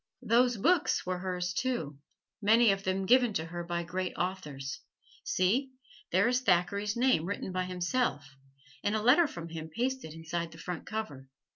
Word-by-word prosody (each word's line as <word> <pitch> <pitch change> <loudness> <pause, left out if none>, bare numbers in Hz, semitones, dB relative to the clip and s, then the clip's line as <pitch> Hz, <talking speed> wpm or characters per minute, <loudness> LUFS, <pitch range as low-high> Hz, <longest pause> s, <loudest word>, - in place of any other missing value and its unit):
Those 245 0 +3
books 325 - +2
were 180 0 -2
hers, 180 -1 -2
too 160 - -2 0.4
many 220 +2 +5
of 195 0 -2
them 190 0 -1
given 245 +1 +4
to 160 - -1
her 175 +1 -5
by 170 0 -2
great 185 +2 -3
authors. 150 -8 -4 0.4
See, 250 +9 +1 0.4
there 190 +6 +4
is 250 +1 +2
Thackeray's 200 +1 +1
name 245 -10 +3
written 195 0 -4
by 185 0 -1
himself, 180 - -1 0.5
and 205 +1 +1
a 215 - 0
letter 295 +8 +6
from 170 - -8
him 160 -1 -6
pasted 245 -2 -2
inside 165 0 -4
the - - -12
front 175 0 -6
cover. 145 -12 -5
185 Hz, 165 wpm, -30 LUFS, 170-235 Hz, 0.5 s, letter